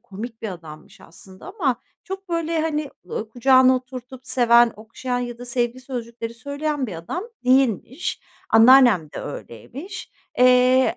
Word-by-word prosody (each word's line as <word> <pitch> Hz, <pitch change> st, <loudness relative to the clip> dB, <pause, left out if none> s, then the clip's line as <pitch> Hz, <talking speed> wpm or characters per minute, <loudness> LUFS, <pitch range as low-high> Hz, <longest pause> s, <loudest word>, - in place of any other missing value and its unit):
komik 225 Hz, +1 st, -9 dB
bir 220 Hz, -, -3 dB
adammış 160 Hz, -4 st, -11 dB
aslında 185 Hz, +3 st, -15 dB
ama 320 Hz, -, -1 dB, 0.2 s
çok, 385 Hz, 0 st, -7 dB
böyle, 335 Hz, -1 st, -1 dB
hani, 300 Hz, -2 st, -2 dB, 0.2 s
ııı, 215 Hz, +4 st, -5 dB
kucağına 255 Hz, +1 st, +5 dB
oturtup 255 Hz, 0 st, -9 dB
seven, 240 Hz, -2 st, +4 dB
okşayan 240 Hz, +3 st, -4 dB
ya 240 Hz, -1 st, -5 dB
da 245 Hz, -, -8 dB
sevgi 245 Hz, 0 st, -2 dB
sözcükleri 235 Hz, -3 st, -6 dB
söyleyen 285 Hz, +2 st, -3 dB
bir 190 Hz, -, -7 dB
adam 335 Hz, -, -5 dB, 0.2 s
değilmiş. 260 Hz, -, +1 dB, 0.3 s
Anneannem 225 Hz, -, +6 dB
de -, -, -6 dB
öyleymiş. 270 Hz, -, -8 dB, 0.3 s
Eee, 255 Hz, +1 st, +5 dB
250 Hz, 135 wpm, -22 LUFS, 230-270 Hz, 0.3 s, Anneannem